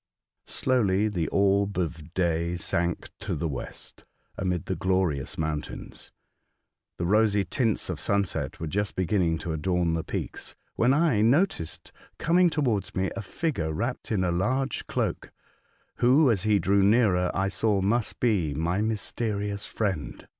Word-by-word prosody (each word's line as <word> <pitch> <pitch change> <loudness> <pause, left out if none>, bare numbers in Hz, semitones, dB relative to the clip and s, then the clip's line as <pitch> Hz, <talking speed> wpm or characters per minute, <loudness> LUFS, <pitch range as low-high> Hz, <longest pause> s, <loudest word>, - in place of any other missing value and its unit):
Slowly 110 -5 +1
the 85 -6 -1
orb 100 0 +2
of 85 -2 -4
day 85 -1 0
sank 85 0 -2
to 100 -3 -3
the 80 +2 -2
west, 65 -5 -7 0.3
amid 90 -4 -2
the 95 - -2
glorious 90 -6 0
mountains. 80 -2 -5 0.9
The 85 - -2
rosy 105 +1 +3
tints 110 +4 0
of - - -4
sunset 100 -5 -1
were 80 - -3
just 100 +5 -2
beginning 90 -3 +1
to 85 - -2
adorn 85 +1 0
the 80 -1 -1
peaks, - - -5 0.2
when 120 +3 +3
I 140 -7 +3
noticed 120 - +1 0.3
coming 175 +2 +4
towards 125 - -1
me 95 0 0
a - - -3
figure 110 - -2
wrapped 120 +11 -3
in 100 -4 +1
a 90 - +1
large 130 +10 -1
cloak, - - -2 0.7
who, 130 +3 +5
as 100 -5 0
he 105 0 +3
drew 100 0 +2
nearer 100 -4 +4
I 95 +1 +1
saw 105 0 +1
must 105 +4 0
be 95 - +1
my 85 +6 0
mysterious 105 -2 -2
friend. 95 -9 -3
100 Hz, 145 wpm, -27 LUFS, 85-110 Hz, 0.9 s, who